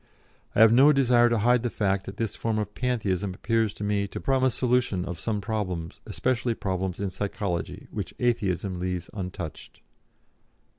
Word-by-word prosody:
I - - +5
have 115 0 +8
no 135 +5 +7
desire 125 -4 +4
to 115 - +2
hide 120 +3 +3
the 120 - -1
fact 100 -3 -1
that 100 - -7
this 110 -3 -2
form 115 -1 -1
of 105 -1 -3
Pantheism 105 -7 -1
appears 115 +1 +1
to - - -6
me 100 -1 0
to - - -6
promise 130 -2 +2
solution 125 -7 +1
of 85 -1 -5
some 105 0 -2
problems, 95 -6 -3
especially 125 -2 0
problems 95 -2 -2
in 100 -2 -2
psychology, 100 -2 -3
which - - -4
Atheism 100 -6 0
leaves 90 -1 -3
untouched. 90 -4 -7
105 Hz, 165 wpm, -26 LUFS, 95-120 Hz, -, have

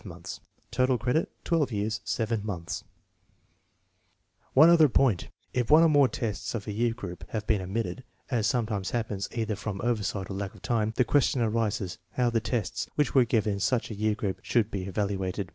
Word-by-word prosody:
5 90 -2 -8 0.3
Total 130 +1 +2
credit 125 +8 0
12 165 -5 +1 0.3
7 110 +1 -1 2.1
One 155 +5 +8
other 160 -4 +6
point: 120 -7 +2 0.3
If 125 -2 0
one 155 +2 +8
or 165 - +6
more 145 -3 +5
tests 115 -2 -3
of 105 - -4
a 105 - -4
year 115 +2 0
group 90 -7 -7
have 110 -2 -3
been 105 -3 +1
omitted, 110 +7 -3 0.3
as 115 -4 +2
sometimes 110 -5 -1
happens 110 -5 -2
either 110 -2 -2
from 100 -1 -5
oversight 105 -4 -1
or - - -3
lack 100 +2 -4
of - - -16
time, 110 -2 0
the 125 - +3
question 135 -2 +2
arises 110 -4 -1
how 125 -2 +1
the 115 - +2
tests 115 -2 -2
which 150 -2 +1
were 130 -3 +6
given 110 -3 +1
in 100 - -4
such 115 +3 0
a - - -4
year 105 +1 +1
group 100 -3 -3
should 115 -3 +1
be 95 -2 -3
evaluated. 95 -1 -2
110 Hz, 180 wpm, -28 LUFS, 100-125 Hz, 2.1 s, One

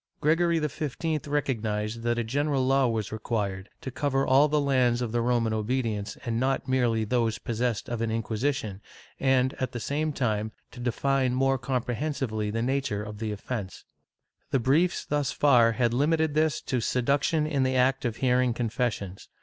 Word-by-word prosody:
Gregory 165 +2 +2
XV 150 0 -2
recognized 115 -6 -1
that 120 0 0
a 120 - 0
general 140 +3 0
law 135 0 +3
was 110 -3 -2
required, 105 -3 -3
to 130 - -5
cover 135 0 0
all 135 +3 +5
the 150 0 +1
lands 130 -4 +2
of 120 -3 -2
the 120 +1 +1
Roman 115 -2 +1
obedience, 110 -2 -2
and 115 -1 -1
not 135 +2 0
merely 120 -4 +2
those 115 0 0
possessed 115 -2 -2
of 120 -1 -3
an 115 - 0
Inquisition 110 -1 -2 0.4
and, 130 -1 +2
at 130 0 -2
the 120 - -3
same 150 +6 -1
time, 110 -5 -1 0.2
to - - -11
define 130 +1 0
more 135 0 +2
comprehensively 125 -2 -2
the 115 +2 -2
natm^e 130 -5 -1
of 105 -1 -8
the 110 -1 -2
offence. 105 -1 -5 0.6
The - - +2
briefs 150 +9 +2
thus 145 -2 0
far 120 -5 +4
had 120 0 +1
limited 155 +3 +2
this 155 0 +1
to 125 -2 -1
seduction 140 +6 +1
in 150 -3 0
the 130 0 +1
act 130 +1 +2
of 120 -4 -1
hearing 125 -1 +2
confessions. 115 -5 -3
125 Hz, 170 wpm, -27 LUFS, 115-140 Hz, 0.6 s, all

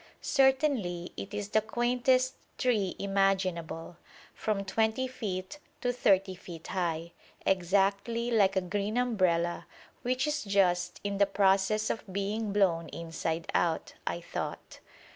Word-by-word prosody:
Certainly 265 - +2
it 195 - -6
is 205 -1 -4
the 215 - +3
quaintest 250 +3 +2 0.2
tree 215 -7 +1
imaginable, 190 -4 0 0.4
from 205 -2 -2
20 220 +5 +1
feet 210 -1 -5 0.2
to 245 -1 +1
30 195 -5 +3
feet 175 -3 -10
high, 170 -2 -2 0.3
exactly 200 +6 +1
like 200 -4 +4
a 190 - +3
green 205 +4 -2
umbrella 185 -8 +1 0.3
which 255 +1 0
is 300 -1 -1
just 180 -3 +2
in 200 -1 -2
the 200 - +5
process 195 +2 +2
of - - -4
being 205 +2 -2
blown 180 -5 +2
inside 165 0 -3
out, 165 -2 0
I - - -1
thought. - - -6
200 Hz, 125 wpm, -30 LUFS, 180-225 Hz, 0.4 s, the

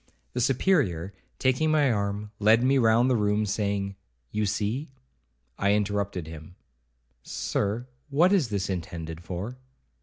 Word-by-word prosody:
The 125 - -1
Superior, 120 - +1 0.2
taking 130 +4 +2
my 150 -4 +4
arm, 105 0 -2
led 110 +3 +5
me 135 +1 +4
round 115 +1 +4
the 130 - +3
room, 105 -1 +1
saying, 100 -1 -1 0.3
'You 105 -1 0
see—' 105 +9 -2 0.7
I 100 +1 +3
interrupted 100 -4 -1
him—'Sir, 65 - -6 0.2
what 170 +7 +4
is 165 - +2
this 100 -3 -1
intended 85 -3 -5
for?' 100 +9 -5
105 Hz, 125 wpm, -27 LUFS, 95-125 Hz, 0.7 s, led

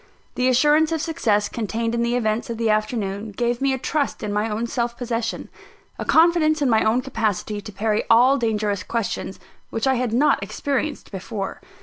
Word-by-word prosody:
The 250 - +1
assurance 295 +5 +4
of 325 - 0
success 235 -11 +1
contained 230 +1 -3
in 235 - 0
the 235 +1 +1
events 225 +1 -1
of 230 - -3
the 225 -1 +1
afternoon, 215 -1 -2
gave 240 +3 -1
me 275 0 +2
a 265 - 0
trust 285 0 -2
in 205 -1 -2
my 210 +2 0
own 220 +2 -2
self 235 0 -2
possession 235 -2 -3 0.5
a - - -3
confidence 320 -1 +4
in 280 -4 +2
my 220 - +4
own 225 +3 +2
capacity 210 -4 -2
to 210 - -9
parry 210 +2 0
all 250 +4 +6
dangerous 210 -4 0
questions 200 -1 -3 0.3
which 225 - -2
I 265 - +3
had 245 -2 -1
not 275 +3 +3
experienced 275 +8 -3
before. 195 0 -5
230 Hz, 190 wpm, -22 LUFS, 215-265 Hz, 0.5 s, all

